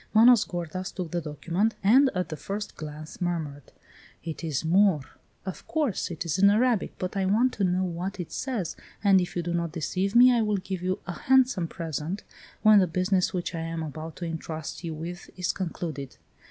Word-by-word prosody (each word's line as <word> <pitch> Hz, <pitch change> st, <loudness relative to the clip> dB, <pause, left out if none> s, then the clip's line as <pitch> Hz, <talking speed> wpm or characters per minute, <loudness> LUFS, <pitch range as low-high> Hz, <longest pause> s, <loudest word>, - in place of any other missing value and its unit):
Manos 235 Hz, 0 st, +7 dB
gordas 175 Hz, +2 st, -4 dB
took 180 Hz, -4 st, -5 dB
the 175 Hz, -1 st, -1 dB
document, 170 Hz, +8 st, -1 dB
and 260 Hz, +7 st, +6 dB
at 180 Hz, -2 st, -1 dB
the 155 Hz, -, -4 dB
first 205 Hz, +6 st, -5 dB
glance 155 Hz, +1 st, -8 dB
murmured: 155 Hz, -6 st, -3 dB, 0.5 s
"It 165 Hz, +1 st, -6 dB
is 160 Hz, -2 st, -2 dB
Moor 185 Hz, -2 st, +4 dB, 0.2 s
" -, -, -39 dB
"Of 190 Hz, -, -7 dB
course, 295 Hz, -, 0 dB
it 170 Hz, -1 st, -5 dB
is 165 Hz, +1 st, -1 dB
in 200 Hz, +1 st, +7 dB
Arabic. 225 Hz, 0 st, +2 dB
But 185 Hz, +2 st, -4 dB
I 190 Hz, -1 st, +1 dB
want 235 Hz, +6 st, +3 dB
to 200 Hz, -, -2 dB
know 185 Hz, 0 st, +2 dB
what 185 Hz, +2 st, -3 dB
it 175 Hz, -, -5 dB
says, 235 Hz, -, -3 dB, 0.3 s
and 195 Hz, -2 st, +6 dB
if 180 Hz, -, -4 dB
you 175 Hz, -, -1 dB
do 170 Hz, 0 st, -2 dB
not 170 Hz, -2 st, -1 dB
deceive 185 Hz, +5 st, -1 dB
me 250 Hz, +1 st, +8 dB
I 235 Hz, -, +3 dB
will 210 Hz, -2 st, +1 dB
give 185 Hz, -1 st, -4 dB
you 185 Hz, +1 st, 0 dB
a 185 Hz, -, -4 dB
handsome 255 Hz, -7 st, +3 dB
present 165 Hz, +3 st, -4 dB, 0.4 s
when 215 Hz, -1 st, +8 dB
the 185 Hz, -, +3 dB
business 185 Hz, +2 st, +1 dB
which 180 Hz, -1 st, -3 dB
I 165 Hz, -, -3 dB
am 165 Hz, 0 st, -3 dB
about 155 Hz, +1 st, -6 dB
to 175 Hz, -, -5 dB
entrust 160 Hz, 0 st, -5 dB
you 165 Hz, -2 st, -4 dB
with 170 Hz, +3 st, -7 dB
is 180 Hz, -1 st, 0 dB
concluded." 160 Hz, -7 st, -5 dB
180 Hz, 205 wpm, -27 LUFS, 165-200 Hz, 0.5 s, me